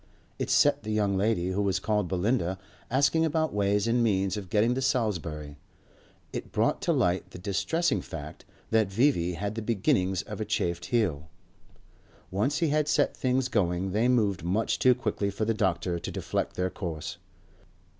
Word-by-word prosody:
It - - -2
set - - +4
the 110 - -7
young 105 -2 +1
lady 95 -2 +1
who 100 +2 0
was 100 -2 +1
called 105 -1 0
Belinda 95 0 0 0.3
asking 140 +5 +3
about 160 0 0
ways 100 0 +1
and 120 +1 +2
means 95 -4 +1
of 100 -4 -6
getting 110 +3 +3
to 130 - -2
Salisbury; 85 - -2 0.7
it - - -5
brought - - +1
to - - +1
light 90 +1 +1
the - - -10
distressing 135 - 0
fact 75 -1 -8 0.3
that 110 -3 +3
V.V. 95 -6 +2
had 100 +5 -3
the 115 - -4
beginnings 95 -4 +1
of - - -7
a - - +1
chafed 85 0 -1
heel. 85 - 0 1.0
Once 125 +11 0
he 165 - +1
had 150 0 +1
set - - +2
things 130 0 +1
going 95 -4 0
they 110 +5 +2
moved 105 -8 +2
much 95 +6 0
too 125 -1 +5
quickly 110 -5 -1
for 100 +2 -2
the 115 - +1
doctor 90 -3 0
to - - -5
deflect - - -3
their 90 0 -1
course. 80 -6 -5
100 Hz, 175 wpm, -28 LUFS, 90-120 Hz, 1.0 s, too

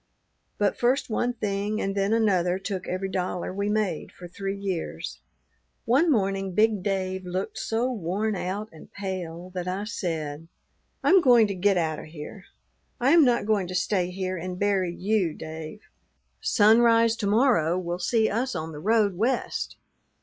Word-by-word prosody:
But 205 -1 0
first 245 0 +1
one 245 +3 0
thing 210 -1 -2
and 195 - -1
then 195 +1 0
another 185 -6 +2
took 195 -1 -5
every 185 +1 -2
dollar 185 -1 -3
we 200 +1 -1
made 210 -6 -1
for 175 - -11
three 195 +2 -4
years. 190 -4 -4 0.7
"One 275 +9 +3
morning 195 -5 0
big 215 -2 +3
Dave 190 -1 -2
looked 185 +2 -4
so 235 +3 0
worn 205 +1 -1
out 195 +4 -3
and 160 - -14
pale 185 -3 -5
that 180 -1 -4
I 185 +2 -2
said, 165 -7 -4 0.6
'I - - +3
am 380 -1 +7
going 245 -6 +6
to 200 - -2
get 195 +1 +2
out 160 -3 0
of - - -9
here; 155 +5 -10 0.5
I 255 +3 +3
am 335 -1 +7
not 245 -5 +2
going 205 -4 +1
to 185 - -5
stay 180 -1 +1
here 185 0 -3
and 180 +1 -5
bury 195 -3 +1
you, 185 -2 0
Dave. 160 +5 -8 0.6
Sunrise 230 +1 +4
to 205 - -2
morrow 205 - +3
will 175 -1 -3
see 220 +4 +2
us 250 +4 -1
on 160 +1 -4
the 150 - -8
road 210 +1 +2
West. 240 +6 -1
195 Hz, 170 wpm, -26 LUFS, 180-220 Hz, 0.7 s, am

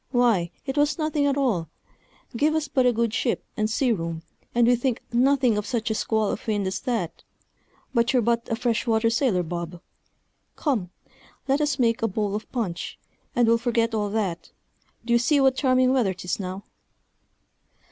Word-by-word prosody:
why, 235 -9 +2 0.2
it 270 0 -4
was 290 0 +2
nothing 310 -2 0
at 280 0 +1
all; 210 - 0 0.7
give 300 +6 +2
us 310 -1 0
but 260 -2 +2
a - - +5
good 230 -1 0
ship 240 - -1
and 215 0 0
sea 245 +3 +1
room, 165 -5 -3 0.3
and 240 0 +5
we 245 +1 +5
think 245 0 -1
nothing 250 -3 +3
of 210 - -5
such 235 -3 -1
a - - +2
squall 220 -1 0
of - - -6
wind 205 -2 0
as 190 - -2
that; 225 -10 -3 0.7
but 235 -1 +2
you're 260 - +3
but 235 0 0
a 225 - +1
fresh 235 0 -1
water 225 0 +2
sailor, 230 -7 +1
Bob. 170 +1 -5 0.8
Come, 235 - -1 0.6
let 275 +2 +2
us 295 -2 +1
make 235 -2 +2
a 225 - +2
bowl 205 0 -2
of 215 +2 -5
punch, 210 -9 -3 0.4
and 240 -1 +3
we'll 230 0 +4
forget 230 -1 0
all 210 -2 0
that; 195 -6 -2 0.6
d'ye 235 0 +3
see 285 +5 +3
what 265 -1 +4
charming 255 -1 +3
weather 220 -8 +1
'tis 180 +1 -3
now?" 190 +1 -5
235 Hz, 185 wpm, -25 LUFS, 210-260 Hz, 0.8 s, a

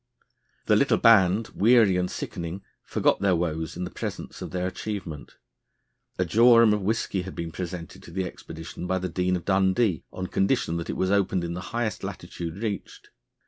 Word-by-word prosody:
The - - +4
little - - +3
band, 110 -1 +5
weary 110 -2 +4
and 90 0 0
sickening, 85 +3 -5 0.2
forgot - - +1
their 100 -2 +3
woes 80 -1 -2
in 90 - -3
the 90 - -5
presence - - -6
of - - -5
their 90 0 -2
achievement. 90 -5 -5 0.8
A 90 - +1
jorum 115 +3 +6
of 105 - 0
whisky 100 -1 -1
had 95 +1 -8
been 85 -1 -4
presented 90 -1 -6
to - - -13
the 95 +2 -2
expedition 80 0 -8
by 95 - +1
the 90 0 -3
Dean 90 +2 0
of 85 - -5
Dundee 95 - +2
on 95 - -5
condition 90 -3 0
that 85 - -5
it - - -3
was 95 0 +1
opened 95 -3 +2
in 85 0 -3
the 90 - -5
highest 115 -2 -2
latitude 85 0 -6
reached. 105 -4 -5
95 Hz, 185 wpm, -26 LUFS, 85-100 Hz, 0.8 s, jorum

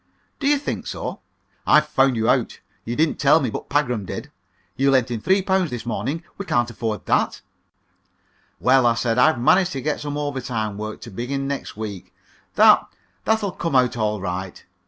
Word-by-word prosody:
"Do 280 - -1
you 290 0 +4
think 280 - -4
so? - - -5 0.5
I've 150 0 +6
found 135 -3 +2
you 110 -1 0
out. 125 -1 +1 0.3
You 120 - -3
didn't 155 +2 +1
tell 145 +3 +5
me, 130 -7 -2
but - - -6
Pagram 125 -7 0
did. 95 - -7 0.4
You 135 +1 +2
lent 130 -3 +2
him 115 -3 -3
three 190 - +2
pounds 190 -3 +1
this 120 -4 -6
morning. 145 +7 -3 0.2
We 200 - -4
can't 120 -1 +1
afford 110 -1 -4
that." - - +1 1.2
"Well, 130 +1 +4
well," 120 -1 +4
I - - -1
said; 115 0 0
"I've 155 0 +4
managed 180 +8 +3
to 135 - -3
get 150 +2 -1
some 145 0 -4
overtime 125 -8 -3
work, 110 0 -6
to 115 - -9
begin 135 +7 -3
next 140 -6 -5
week. 105 -4 -7 0.4
That - - +7 0.4
that'll 220 -3 +1
come 165 -5 -3
out 125 -1 +3
all 105 -2 -1
right. 95 0 -5
130 Hz, 190 wpm, -22 LUFS, 115-150 Hz, 1.2 s, That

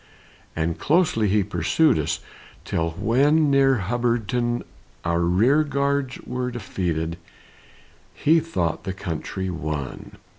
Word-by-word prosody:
And 80 +1 -1
closely 155 - +2
he 105 +1 +3
pursued 105 - +2
us, 75 - -2 0.4
Till 85 0 -1
when 145 +7 +3
near 135 -5 +4
Hubbardton, 120 0 0 0.4
Our 85 0 +1
rear 110 - +3
guards 140 -2 -1
were 125 0 -3
defeated, 85 -8 -3 1.0
He 160 +3 +4
thought 90 - -2
the 95 - -3
country 95 +2 -4
won. 75 -5 -5
115 Hz, 110 wpm, -23 LUFS, 85-140 Hz, 1.0 s, near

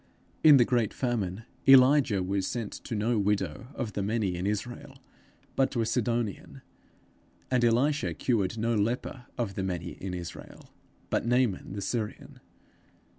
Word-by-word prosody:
In 150 -3 +9
the 120 - +5
great 120 -5 0
famine, 110 -5 -2 0.3
Elijah 130 -6 +6
was 95 +1 -1
sent 115 -4 -3
to 115 - -3
no 110 +2 +1
widow 100 -3 -1
of 115 -5 -4
the 100 - -2
many 100 -2 -1
in 90 +3 -2
Israel, 105 +4 -4 0.6
but 135 - +3
to 120 - -1
a - - +1
Sidonian; 115 -3 -2 0.9
and 125 -2 +2
Elisha 135 +6 +2
cured 115 -4 0
no 115 +2 0
leper 120 +3 -2
of 115 -6 -2
the 95 - -3
many 90 -2 -3
in 95 -1 -6
Israel, 85 -2 -9 0.4
but - - 0
Naaman 120 -6 +1
the 100 - -4
Syrian. 110 -2 -4
115 Hz, 150 wpm, -28 LUFS, 100-125 Hz, 0.9 s, In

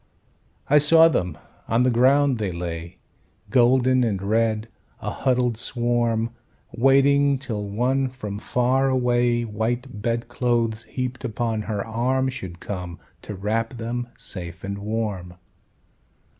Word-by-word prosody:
I 150 +1 +6
saw 160 +2 +7
them; 90 - -1 0.3
on 115 +2 +2
the 130 - +3
ground 130 +2 +3
they 100 -3 -1
lay, 85 0 -6 0.5
Golden 130 0 +4
and 105 -5 0
red, 110 +2 0 0.3
a - - -4
huddled 125 -3 0
swarm, 120 -1 0 0.4
Waiting 140 +2 +4
till 110 -6 -4
one 130 +5 0
from 105 -6 -6
far 130 +4 +1
away, 120 -2 +2
White 115 +2 -3
bedclothes 120 0 -1
heaped 125 0 -4
upon 115 -2 -2
her 105 -2 -2
arm, 130 +4 0
Should 95 -10 -7
come 90 -4 -6 0.2
to 105 - -7
wrap 115 +5 -2
them 120 +1 -4
safe 90 -1 -6
and 100 +1 -4
warm. 100 -4 -3
120 Hz, 125 wpm, -23 LUFS, 105-130 Hz, 0.5 s, saw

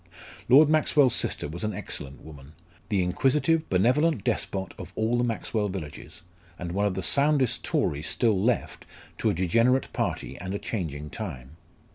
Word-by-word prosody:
Lord 145 +4 +8
Maxwell's 150 -4 +3
sister - - 0
was 85 +4 -7
an 105 -2 -2
excellent 70 -8 -3
woman, 75 -1 -13 0.4
the 100 -4 +1
inquisitive, 140 - +1
benevolent 125 - +2
despot 95 -2 -2
of - - -8
all 110 +2 0
the 120 - +1
Maxwell 110 -2 -1
villages; 85 -3 -7 0.3
and 85 -1 -5
one 100 +3 +1
of 95 - -3
the 95 - -3
soundest 140 -1 +3
Tories 75 +3 -1
still 105 -2 +2
left 120 -1 -1 0.3
to - - +1
a - - +1
degenerate 115 +9 +2
party - - -3
and 95 +2 -5
a - - 0
changing 75 -9 -5
time. 70 - -7
105 Hz, 160 wpm, -26 LUFS, 85-125 Hz, 0.4 s, Lord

